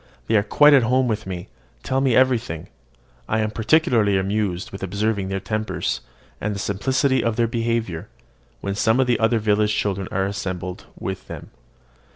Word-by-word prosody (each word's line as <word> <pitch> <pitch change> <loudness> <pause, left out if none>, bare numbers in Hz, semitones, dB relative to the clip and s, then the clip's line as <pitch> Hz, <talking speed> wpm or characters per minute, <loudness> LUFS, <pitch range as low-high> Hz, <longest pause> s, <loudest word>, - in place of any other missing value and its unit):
They 115 - +1
are 105 - +5
quite 145 +8 +5
at 135 - +7
home 125 +2 +2
with 110 -4 -2
me, 90 -2 -5 0.4
tell 130 +1 0
me 130 -3 +3
everything; 120 -10 +2
and - - -16 0.6
I 110 - +1
am 110 0 -1
particularly 110 - +3
amused 95 -2 -1
with 95 - -8
observing 100 +1 -1
their 95 0 -2
tempers, 110 +3 -2 0.4
and 105 0 -2
the - - -5
simplicity 130 +8 +1
of 115 -1 0
their 120 0 +2
behaviour, 115 -6 -2 0.5
when 100 - -2
some 110 +4 +2
of 130 - +4
the 125 -1 +1
other 115 +1 +3
village 105 0 +2
children 100 -3 -1
are 95 0 0
assembled 90 -2 -4
with - - -5
them. - - -9
110 Hz, 180 wpm, -22 LUFS, 100-120 Hz, 0.6 s, at